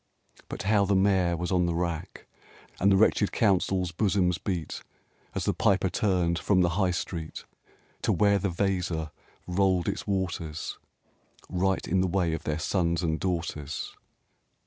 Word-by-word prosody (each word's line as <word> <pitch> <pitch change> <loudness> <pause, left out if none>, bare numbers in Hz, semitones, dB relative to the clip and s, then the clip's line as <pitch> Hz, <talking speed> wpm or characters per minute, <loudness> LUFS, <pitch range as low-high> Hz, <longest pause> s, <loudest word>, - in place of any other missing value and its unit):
But - - -5
how 105 0 +3
the 100 0 +2
Mayor 95 -3 +3
was 90 +3 -3
on 90 -2 +2
the 85 - -1
rack, 85 -2 -3 0.5
And 100 +2 +4
the 95 - +5
wretched 105 0 +3
Council's 95 -3 +1
bosoms 90 -2 +1
beat, 85 -4 -3 0.5
As - - -2
the - - +2
Piper 95 -2 +2
turned 90 -4 +1
from 95 -3 +2
the 85 - +3
High 95 +2 +1
Street 85 -2 -4 0.6
To - - +1
where 100 -1 +3
the 100 +1 -1
Weser 90 -4 -1 0.3
rolled 90 -1 +1
its - - -3
waters 90 -5 -3 0.7
Right 95 +1 0
in 95 +2 +2
the 95 - +1
way 90 -2 +1
of 80 - -5
their 75 -1 -1
sons 85 0 0
and 80 -1 0
daughters 85 -5 -3
90 Hz, 155 wpm, -27 LUFS, 85-95 Hz, 0.7 s, the